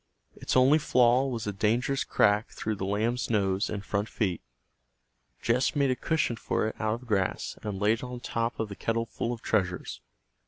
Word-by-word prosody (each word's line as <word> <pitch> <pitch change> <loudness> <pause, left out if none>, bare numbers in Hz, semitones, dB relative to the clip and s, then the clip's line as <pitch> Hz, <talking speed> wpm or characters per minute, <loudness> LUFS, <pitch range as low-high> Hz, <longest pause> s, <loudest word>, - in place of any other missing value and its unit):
Its - - -1
only 135 +5 +6
flaw 125 -2 +4
was 120 -4 -3
a 105 - -2
dangerous 120 +7 +1
crack 105 +1 +2
through 110 - -3
the 95 -2 -4
lamb's 115 +5 0
nose 100 -3 +1
and 100 -2 -4
front 105 +1 -1
feet. 95 -7 -1 1.0
Jess 125 +6 +2
made 140 -2 +3
a - - +1
cushion 155 -5 0
for - - -1
it 110 - -3
out 110 0 0
of - - -15
grass 95 -4 -1
and 105 -3 -4
laid 105 +3 +2
it - - -9
on 125 -1 -6
top 115 0 -2
of 110 -2 -2
the 100 - -7
kettle 115 +2 -1
full 115 +1 -3
of 120 -2 -6
treasures. 90 - -1
115 Hz, 195 wpm, -28 LUFS, 105-125 Hz, 1.0 s, only